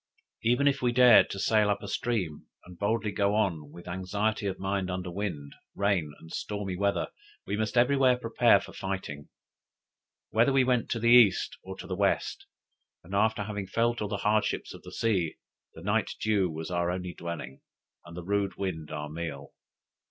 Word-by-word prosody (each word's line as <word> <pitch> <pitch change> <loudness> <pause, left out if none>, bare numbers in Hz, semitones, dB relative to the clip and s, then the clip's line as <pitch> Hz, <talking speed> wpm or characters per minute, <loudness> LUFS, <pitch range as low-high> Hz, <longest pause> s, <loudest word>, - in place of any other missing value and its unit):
Even 125 +5 +3
if 140 0 +2
we 125 -1 +2
dared 125 -1 +7
to - - -5
sail 105 +1 +3
up 100 - -1
a - - -6
stream 100 -9 -2 0.2
and 90 -1 -13
boldly 105 +1 0
go 100 +1 +1
on 85 -9 0
with 85 - -12
anxiety 100 +4 -1
of 95 - -3
mind 95 -1 -2
under 90 -1 -4
wind, 85 -7 -4 0.2
rain, 100 -7 +1
and 80 - -12
stormy 100 -3 -3
weather, 100 +2 0 0.4
we - - -2
must 110 +2 -2
everywhere 130 0 +4
prepare 115 -3 +4
for 100 - -11
fighting. 95 -7 -5 1.0
Whether 115 +5 +4
we 135 -1 +4
went 125 -2 +1
to 115 - -1
the 115 +1 +3
east, 120 -6 +5
or 95 0 -8
to 90 - -8
the 95 - -4
west, 100 +1 0 0.6
and 90 +4 -11
after 110 +1 +2
having 100 -1 -5
felt 120 +2 0
all 105 - -1
the 100 - -2
hardships 105 +1 0
of - - -11
the - - -11
sea, 95 -8 0 0.4
the - - -11
night - - 0
dew 105 -4 +2
was 80 +1 -6
our 85 0 0
only 90 0 -3
dwelling, 85 -6 -7 0.4
and 85 +1 -11
the 90 - -5
rude 100 +1 0
wind 80 -6 -4
our 75 -1 -4
meal. 75 -3 -6
100 Hz, 185 wpm, -29 LUFS, 90-110 Hz, 1.0 s, dared